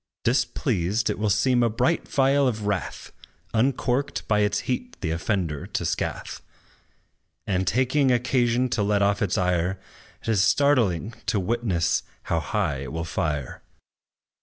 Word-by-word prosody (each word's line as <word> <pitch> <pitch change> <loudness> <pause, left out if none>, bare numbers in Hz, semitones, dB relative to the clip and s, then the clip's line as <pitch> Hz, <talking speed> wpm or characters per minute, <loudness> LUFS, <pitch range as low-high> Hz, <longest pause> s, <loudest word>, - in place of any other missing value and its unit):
Displeased, 115 - 0
it - - -5
will 105 0 +1
seem 120 +5 +3
a 120 - +3
bright 120 +4 0
vial 140 0 +3
of 110 -4 -2
wrath, 100 -3 -3 0.4
Uncorked 125 +3 0
by 105 -1 +2
its 105 0 +1
heat 245 - -4
the 80 -5 -1
offender 80 -3 -2
to - - -3
scath; - - -3 1.0
And 95 -2 -1
taking 130 +6 +2
occasion 125 0 +2
to 115 - 0
let 100 0 +2
off 100 0 +1
its 100 -4 0
ire, 90 +1 0 0.4
'T 115 - -1
is 100 -4 +3
startling 115 - +2
to 105 - +1
witness 95 -4 0 0.2
how - - 0
high 70 - -1
it 65 -1 -6
will 80 0 -3
fire. 75 -4 -3
105 Hz, 145 wpm, -25 LUFS, 90-125 Hz, 1.0 s, seem